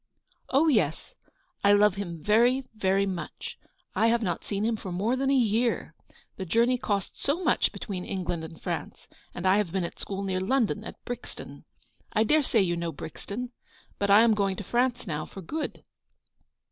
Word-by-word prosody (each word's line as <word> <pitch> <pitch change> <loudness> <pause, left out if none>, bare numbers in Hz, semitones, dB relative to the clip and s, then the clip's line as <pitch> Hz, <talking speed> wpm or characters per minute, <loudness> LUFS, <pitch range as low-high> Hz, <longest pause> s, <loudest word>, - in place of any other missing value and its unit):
" - - -38
Oh, 285 +5 +4
yes, 200 - +1 0.5
I 200 0 +6
love 205 -1 +5
him 175 -5 -6
very, 240 +5 +4
very 195 -2 +2
much. 185 -3 -5 0.3
1 225 - +3
have 235 0 +2
not 175 -4 -2
seen 205 +1 -2
him 230 0 +1
for 195 -3 -6
more 205 +8 +1
than 270 +1 0
a 275 - +4
year. 235 -1 +1 0.4
The 190 - -3
journey 235 +7 +3
costs 200 -5 -2
so 315 +6 0
much - - +3
between 185 -4 -5
England 175 -4 -3
and 160 0 -9
France, - - -5 0.3
and 175 - -5
I 190 +2 +5
have 205 -5 0
been 190 0 0
at 170 - -6
school 195 0 -4
near 190 -1 -1
London, 215 0 +1
at - - -10
Brixton; 245 -1 -7 0.5
I 220 -1 +4
dare 305 +8 +4
say 235 -5 +2
you 175 -2 0
know 170 -1 -2
Brixton; 210 - -6 0.5
but 200 - 0
I 205 +2 +8
am 230 -1 +5
going 200 -2 +1
to 205 - -6
France 245 +3 0
now, 155 -5 -3
for 195 - -9
good." 310 - -4
205 Hz, 190 wpm, -28 LUFS, 185-240 Hz, 0.5 s, I